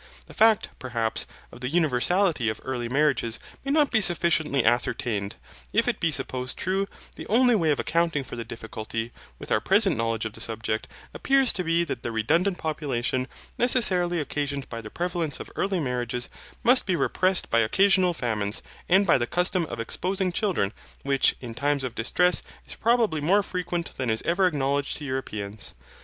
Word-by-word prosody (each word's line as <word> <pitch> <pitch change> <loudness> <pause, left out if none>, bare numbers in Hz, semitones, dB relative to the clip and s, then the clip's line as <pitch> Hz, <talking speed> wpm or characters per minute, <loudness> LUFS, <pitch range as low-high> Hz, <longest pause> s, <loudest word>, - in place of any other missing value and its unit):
The - - -14
fact, 220 -1 +4
perhaps, 115 -4 -2 0.2
of - - -13
the 125 - -2
universality 160 - +2
of 110 - -4
early 125 -3 -3
marriages 135 -4 +1 0.3
may 275 - -4
not 295 -2 +3
be 220 - +3
sufficiently 165 - +2
ascertained. 110 -3 0 0.4
If - - +3
it - - 0
be 165 - +1
supposed 130 -2 -2
true, 195 +2 0 0.3
the - - -8
only 245 +2 +4
way 170 -8 +2
of 145 - +2
accounting 165 -4 +1
for - - -8
the 120 - -4
difficulty, 115 0 -6 0.3
with - - -9
our 110 - +3
present 195 -1 +3
knowledge 115 -1 -1
of 110 - -4
the 115 - -10
subject, 110 -1 -3 0.3
appears 270 -2 +3
to 185 - -2
be 165 0 +2
that 170 - -4
the 120 - -3
redundant 165 - +1
population, 130 -5 -2 0.3
necessarily 185 -8 +2
occasioned 145 -2 -3
by 115 -1 -5
the 110 - -9
prevalence 170 -1 -2
of - - -8
early 195 -2 0
marriages, 125 -3 -2 0.3
must 245 0 +4
be 185 - +2
repressed 185 +2 +1
by 115 - +4
occasional 185 - +3
famines, 110 -6 -2 0.3
and 190 +3 +5
by 170 - +4
the 120 - -1
custom 180 +1 +1
of 120 - -6
exposing 185 - -1
children, 175 - 0 0.3
which, 140 -1 +2
in 120 -3 -6
times 140 +3 0
of 125 -3 -3
distress, 180 +10 +2 0.2
is - - -7
probably 225 -9 +2
more 195 +7 +3
frequent 175 -2 -3
than 130 -2 -1
is 110 0 0
ever 175 +3 +3
acknowledged 140 -3 0
to 150 - -7
Europeans. 110 -6 -5
150 Hz, 175 wpm, -26 LUFS, 120-180 Hz, 0.4 s, and